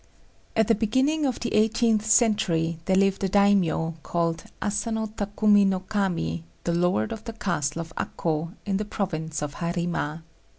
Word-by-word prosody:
At 220 -1 +3
the 230 - +5
beginning 260 +8 +1
of 255 - -2
the 235 - -2
eighteenth 220 0 +2
century 200 -8 +2
there 190 - +2
lived 195 0 +2
a 195 - +1
daimio, 190 -5 +3
called 165 0 -1
Asano 220 +2 -1
Takumi 205 -1 +2
no 190 -1 +1
Kami, 185 - -1 0.2
the 170 - 0
Lord 170 -11 +1
of 220 - -6
the 230 - -5
castle 165 -7 -2
of 165 0 -9
Akô, 165 0 -2
in 195 -2 0
the 210 - -2
province 160 -7 -3
of 145 -1 -5
Harima. 170 -2 -2
195 Hz, 160 wpm, -25 LUFS, 165-215 Hz, 0.2 s, the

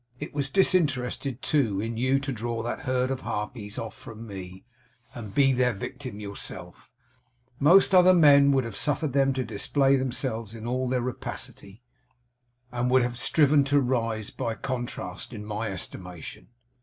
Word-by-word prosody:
It - - -7
was 140 -1 -1
disinterested 140 -8 +1
too, 120 -11 +1
in 115 +2 -3
you, 130 +4 +2
to 140 0 -3
draw 115 -1 -3
that 120 - -3
herd 130 0 +1
of 130 - -3
harpies 105 0 -5
off 115 - -5
from 115 0 -10
me, 95 -2 -9 0.5
and 110 -4 -8
be 135 -1 +5
their 125 -1 +2
victim 110 +2 -7
yourself; 100 -3 -7 0.7
most 185 +7 +6
other 185 0 +7
men 140 -4 +7
would 135 -1 +2
have 115 -3 -6
suffered 145 +4 -1
them 135 -1 +3
to 130 0 -1
display 135 +6 +2
themselves 120 -4 -3
in 115 0 -8
all 125 +1 -1
their 125 -1 0
rapacity, 115 -3 -6 0.9
and 125 0 -1
would 130 0 +4
have 120 0 -3
striven 145 +2 +4
to 140 +1 +3
rise, 115 -5 -1
by 115 -1 -3
contrast, 120 -5 -5
in 105 -2 -7
my 105 +1 -3
estimation. 90 -2 -7
125 Hz, 160 wpm, -26 LUFS, 110-135 Hz, 0.9 s, other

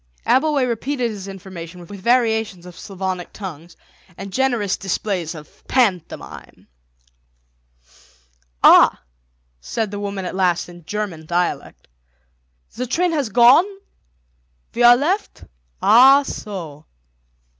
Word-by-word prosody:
Abbleway 285 -1 +2
repeated 245 +1 -2
his 200 -2 -8
information 185 -3 -9
with 200 +3 -10
variations 220 -6 0
of 180 -1 -12
Slavonic 185 -2 -5
tongues 175 -4 -9 0.4
and 195 -1 -8
generous 240 -7 0
displays 190 -3 -3
of 150 -1 -14
pantomime. 195 -10 -2 2.0
"Ah," - - +6 0.6
said 215 - -4
the 205 - -5
woman 200 -2 -4
at - - -5
last 180 -2 0
in 175 -2 -14
German 195 -7 -5
dialect, 175 +1 -3 0.9
"the 250 +1 -4
train 350 +8 0
has 290 -7 -1
gone? 245 - +6 1.1
We 240 - -3
are 240 0 +8
left. 365 +10 -2 0.4
Ah, 265 +5 +7
so." 165 - -8
205 Hz, 110 wpm, -20 LUFS, 180-245 Hz, 2.0 s, are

